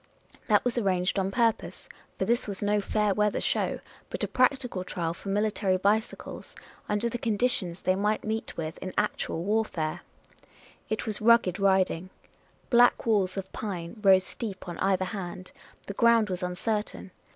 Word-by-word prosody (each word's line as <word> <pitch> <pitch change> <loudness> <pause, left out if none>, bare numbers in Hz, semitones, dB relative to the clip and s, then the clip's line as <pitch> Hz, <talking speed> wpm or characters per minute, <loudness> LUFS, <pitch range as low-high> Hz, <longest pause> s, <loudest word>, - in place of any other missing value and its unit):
That - - +3
was 245 -1 +1
arranged 185 -2 +1
on 190 0 0
purpose 225 +2 0
— - - -32
for - - 0
this 235 0 +1
was 200 0 -4
no 205 0 +2
fair 210 0 +1
weather 210 +1 +1
show - - -1
— - - -26
but - - -4
a - - +1
practical 255 -6 +1
trial 170 -2 -3
for 190 +3 -8
military 205 -2 +1
bicycles, 210 +4 -2 0.3
under 210 +3 +1
the 240 +1 -4
conditions 210 -6 0
they 185 - +3
might 210 +3 0
meet 220 +1 -4
with 160 -1 -4
in 185 - -6
actual 210 -5 -1
warfare. 195 -6 -1 0.9
It 220 - -2
was 215 -1 -1
rugged 230 -4 +4
riding: 190 -2 +2 0.6
black 245 0 +5
walls 200 -5 +1
of 190 0 -5
pine 190 0 -5
rose 190 -2 +6
steep 195 -2 -6
on 175 -1 -6
either 190 -1 +1
hand; 185 -2 -6 0.3
the 200 - -5
ground 230 -1 +4
was 180 +1 -3
uncertain. 195 +2 -3
200 Hz, 165 wpm, -28 LUFS, 185-220 Hz, 0.9 s, rose